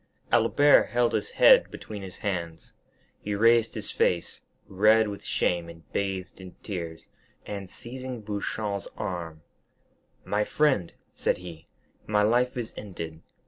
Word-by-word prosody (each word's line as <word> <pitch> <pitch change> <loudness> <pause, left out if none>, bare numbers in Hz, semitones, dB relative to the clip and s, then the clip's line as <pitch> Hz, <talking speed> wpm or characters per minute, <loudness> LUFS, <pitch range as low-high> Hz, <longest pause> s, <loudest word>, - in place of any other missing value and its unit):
Albert 120 +5 +5
held 120 -1 +1
his 110 -2 -1
head - - +6
between 105 -2 -8
his 95 -2 -8
hands; 85 -5 -4 0.5
he 105 0 -3
raised 115 +2 +4
his - - -4
face, 85 -2 0 0.3
red 110 +3 +4
with 100 -1 -6
shame 85 -1 0
and 85 -1 -12
bathed 95 -2 -3
in 95 -1 -11
tears, 85 -5 -6 0.4
and 100 -2 -6
seizing 130 +2 -7
Beauchamp's 105 -1 -3
arm: 85 -4 -5 0.8
"My 105 +1 +1
friend," 130 - +1 0.2
said - - 0
he, 85 -2 -10 0.4
"my 105 -1 +3
life 120 +4 +2
is 120 -2 -4
ended. 85 -6 -7
100 Hz, 135 wpm, -27 LUFS, 90-110 Hz, 0.8 s, head